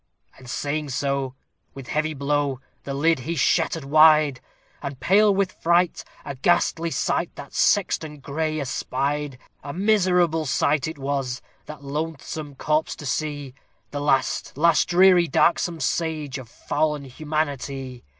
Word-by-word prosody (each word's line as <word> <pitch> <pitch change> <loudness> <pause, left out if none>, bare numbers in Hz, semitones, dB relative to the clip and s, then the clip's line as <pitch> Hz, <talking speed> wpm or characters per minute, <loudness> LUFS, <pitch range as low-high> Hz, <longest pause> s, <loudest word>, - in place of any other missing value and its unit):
And 130 -2 -14
saying 145 +3 -2
so, 135 0 -2 0.4
with 135 -2 -9
heavy 155 0 -1
blow, 140 -1 0 0.3
the 140 - -4
lid 160 +2 +2
he 160 +7 -4
shattered 160 +2 +1
wide, 155 -2 +5 0.4
And, 140 -2 -6
pale 205 +3 +4
with 195 -1 +1
fright, 170 +1 +1 0.2
a - - -4
ghastly 165 +3 +1
sight - - -1
that - - -10
sexton 155 -7 +1
gray 155 +3 -2
espied; 140 +1 -2 0.3
A 140 0 -6
miserable 180 -5 +2
sight 145 +2 +1
it 160 - -6
was, 135 -2 -2 0.3
that 150 -2 -9
loathsome 150 0 -5
corpse 155 +3 0
to 145 - -10
see, 145 -1 -3 0.4
The 145 - -4
last, 135 -2 0
last, 160 -2 +4
dreary, 180 -1 +5
darksome 170 +3 +2
stage 155 -5 -2
of 125 -4 -11
fall'n 150 +3 -1
humanity. 140 -3 -4
150 Hz, 135 wpm, -24 LUFS, 140-165 Hz, 0.4 s, wide